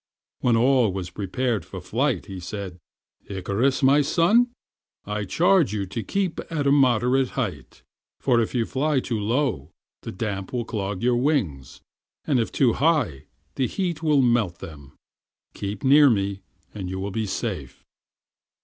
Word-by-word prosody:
When 120 Hz, -2 st, +2 dB
all 125 Hz, -2 st, +3 dB
was 90 Hz, -1 st, -5 dB
prepared 105 Hz, +1 st, -2 dB
for -, -, -8 dB
flight -, -, -1 dB
he 95 Hz, -1 st, -8 dB
said, 90 Hz, -1 st, -6 dB, 0.5 s
"Icarus, 100 Hz, +8 st, -1 dB
my 140 Hz, +3 st, +5 dB
son, 175 Hz, -, +3 dB, 0.6 s
I 105 Hz, 0 st, -3 dB
charge 165 Hz, -, +3 dB
you 100 Hz, -2 st, -2 dB
to 115 Hz, +5 st, -5 dB
keep 190 Hz, -, -2 dB
at 150 Hz, -3 st, -1 dB
a 140 Hz, -, +4 dB
moderate 130 Hz, -1 st, +3 dB
height, 90 Hz, -, -4 dB, 0.4 s
for 120 Hz, -3 st, +2 dB
if 115 Hz, -, -3 dB
you 115 Hz, -2 st, +1 dB
fly 145 Hz, +3 st, 0 dB
too 120 Hz, -3 st, -3 dB
low 110 Hz, -, -1 dB, 0.3 s
the -, -, -6 dB
damp 100 Hz, 0 st, -4 dB
will 120 Hz, -2 st, -1 dB
clog 100 Hz, -2 st, -4 dB
your 120 Hz, 0 st, +3 dB
wings, 115 Hz, -, -1 dB, 0.4 s
and 140 Hz, -5 st, +2 dB
if 115 Hz, -, -1 dB
too 125 Hz, -5 st, +3 dB
high 130 Hz, -, +1 dB, 0.3 s
the 130 Hz, -, 0 dB
heat 175 Hz, -2 st, -3 dB
will 150 Hz, -4 st, +3 dB
melt 115 Hz, -8 st, +1 dB
them. 75 Hz, -6 st, -11 dB, 0.6 s
Keep 100 Hz, 0 st, -5 dB
near 145 Hz, +2 st, +7 dB
me 100 Hz, -3 st, -1 dB, 0.3 s
and 95 Hz, -4 st, -5 dB
you 95 Hz, +1 st, -4 dB
will 100 Hz, +1 st, -4 dB
be 110 Hz, +1 st, -2 dB
safe." 95 Hz, -, -5 dB
115 Hz, 160 wpm, -24 LUFS, 100-135 Hz, 0.6 s, near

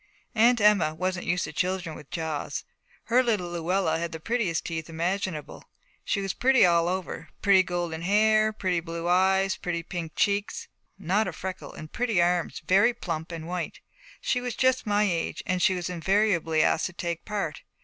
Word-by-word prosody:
Aunt 235 Hz, +1 st, +4 dB
Emma 205 Hz, -7 st, +4 dB
wasn't 185 Hz, +1 st, -2 dB
used 180 Hz, -1 st, +1 dB
to -, -, -5 dB
children 180 Hz, -1 st, -2 dB
with 150 Hz, -, -12 dB
jaws. 160 Hz, -3 st, -3 dB, 0.4 s
Her 245 Hz, +2 st, +3 dB
little 210 Hz, -8 st, -1 dB
Luella 175 Hz, -1 st, 0 dB
had 170 Hz, 0 st, -3 dB
the 160 Hz, -, -6 dB
prettiest 205 Hz, -3 st, -1 dB
teeth 160 Hz, -1 st, -4 dB
imaginable: 170 Hz, -1 st, -3 dB, 0.4 s
she 200 Hz, -, -1 dB
was 195 Hz, -1 st, -2 dB
pretty 260 Hz, -2 st, +4 dB
all 170 Hz, -1 st, +3 dB
over, 185 Hz, 0 st, -4 dB
pretty 195 Hz, -2 st, +6 dB
golden 175 Hz, -3 st, -3 dB
hair, 215 Hz, +3 st, +3 dB
pretty 185 Hz, -5 st, -1 dB
blue 165 Hz, 0 st, -5 dB
eyes, 190 Hz, +2 st, +3 dB
pretty 170 Hz, -1 st, -3 dB
pink 170 Hz, -3 st, -5 dB
cheeks, 200 Hz, 0 st, 0 dB, 0.3 s
not 195 Hz, +4 st, +1 dB
a -, -, -2 dB
freckle, 185 Hz, 0 st, -6 dB
and 155 Hz, -, -10 dB
pretty 235 Hz, -6 st, +1 dB
arms 175 Hz, 0 st, +1 dB
very 200 Hz, +8 st, +4 dB
plump 165 Hz, -1 st, -4 dB
and 165 Hz, -1 st, -6 dB
white. 180 Hz, 0 st, -4 dB, 0.4 s
She 250 Hz, -, 0 dB
was 245 Hz, -2 st, -4 dB
just 260 Hz, -3 st, +2 dB
my 205 Hz, 0 st, +3 dB
age, 175 Hz, -5 st, -1 dB
and 185 Hz, 0 st, -1 dB
she 185 Hz, -, +4 dB
was 175 Hz, -1 st, -3 dB
invariably 180 Hz, -3 st, +2 dB
asked 160 Hz, -, +2 dB
to 185 Hz, -, -11 dB
take 170 Hz, -1 st, -4 dB
part. 200 Hz, -8 st, -3 dB
180 Hz, 180 wpm, -27 LUFS, 170-205 Hz, 0.4 s, pretty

